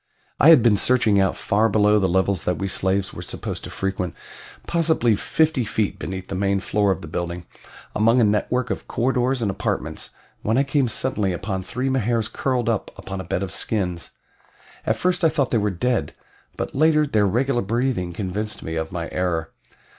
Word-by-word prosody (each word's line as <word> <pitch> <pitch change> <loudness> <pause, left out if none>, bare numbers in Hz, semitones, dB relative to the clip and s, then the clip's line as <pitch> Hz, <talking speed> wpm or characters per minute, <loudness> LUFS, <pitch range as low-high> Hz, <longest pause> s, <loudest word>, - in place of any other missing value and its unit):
I 155 - +7
had 155 -8 +8
been 110 -4 +5
searching 110 -3 +4
about 95 - +1
far 110 +2 +2
below 105 0 +4
the 95 -2 +1
levels 95 0 +1
that 90 - 0
we 95 - -2
slaves 95 +1 0
were - - -7
supposed - - -5
to - - -7
frequent 95 -2 -3 0.5
possibly 160 -9 +2
fifty 155 +4 +1
feet 110 -2 -1
beneath 95 -1 -5
the - - -6
main 100 +1 +1
floor 100 0 +1
of 95 - -3
the - - -7
building 85 +2 -4 0.5
among 115 +4 +4
a - - +5
network 115 +3 +1
of 100 - -4
corridors 125 0 0
and 100 - +1
apartments, - - -3 0.3
when 110 +3 +1
I 135 - +4
came 135 -1 +1
suddenly 110 -5 -1
upon 95 +2 -3
three 125 +7 -3
Mahars 120 -4 0
curled 125 -4 -1
up 115 -3 0
upon 95 -1 -6
a - - -7
bed 90 +2 -2
of 95 - -4
skins. 90 -6 -2 0.7
At - - +3
first 180 0 0
I 165 - +6
thought 145 -4 0
they 115 - +3
were 105 0 +1
dead, 120 +7 -1 0.4
but - - -4
later 155 +1 +4
their 110 -7 +2
regular 120 +5 +1
breathing 115 -3 -1
convinced 105 +4 -4
me 80 0 -4
of 80 0 -3
my 85 -1 -4
error. 85 -3 -1
105 Hz, 190 wpm, -23 LUFS, 95-125 Hz, 0.7 s, had